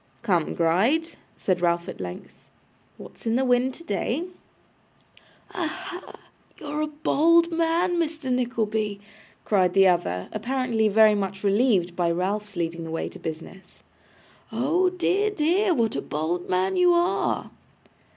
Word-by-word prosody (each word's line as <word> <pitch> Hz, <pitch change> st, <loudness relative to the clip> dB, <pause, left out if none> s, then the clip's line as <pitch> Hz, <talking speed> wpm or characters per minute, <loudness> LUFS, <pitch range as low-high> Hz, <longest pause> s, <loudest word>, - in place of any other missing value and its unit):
'Come, 180 Hz, -8 st, 0 dB
Gride,' 220 Hz, -, +2 dB, 0.3 s
said 180 Hz, -2 st, -1 dB
Ralph, 170 Hz, 0 st, +1 dB
at -, -, -7 dB
length; 90 Hz, -1 st, -9 dB, 0.5 s
'what's -, -, -11 dB
in 225 Hz, -, +1 dB
the 265 Hz, +1 st, +2 dB
wind 250 Hz, +1 st, +2 dB
today?' 290 Hz, -, -2 dB, 1.3 s
'Aha! 365 Hz, +1 st, -5 dB, 0.4 s
you're 300 Hz, 0 st, -4 dB
a 305 Hz, -, 0 dB
bold 330 Hz, +3 st, +3 dB
man, 335 Hz, +2 st, +1 dB
Mr. 315 Hz, -5 st, -1 dB
Nickleby,' 220 Hz, -4 st, -1 dB, 0.5 s
cried 185 Hz, -3 st, +2 dB
the 195 Hz, 0 st, +6 dB
other, 170 Hz, -, 0 dB
apparently 235 Hz, 0 st, 0 dB
very 215 Hz, +1 st, +5 dB
much 195 Hz, -1 st, -3 dB
relieved 200 Hz, -4 st, +2 dB
by 175 Hz, -1 st, +1 dB
Ralph's 200 Hz, +4 st, -2 dB
leading 170 Hz, -1 st, -3 dB
the 165 Hz, -, -7 dB
way 165 Hz, -, -3 dB
to -, -, -12 dB
business. 165 Hz, +4 st, -9 dB, 0.7 s
'Oh 305 Hz, +11 st, +1 dB
dear, 370 Hz, +3 st, +1 dB
dear, 375 Hz, +2 st, +1 dB
what 230 Hz, -4 st, 0 dB
a 140 Hz, -, -1 dB
bold 165 Hz, +4 st, -3 dB
man 185 Hz, +1 st, +1 dB
you 360 Hz, -1 st, +5 dB
are! 345 Hz, +1 st, 0 dB
225 Hz, 135 wpm, -25 LUFS, -, 1.3 s, the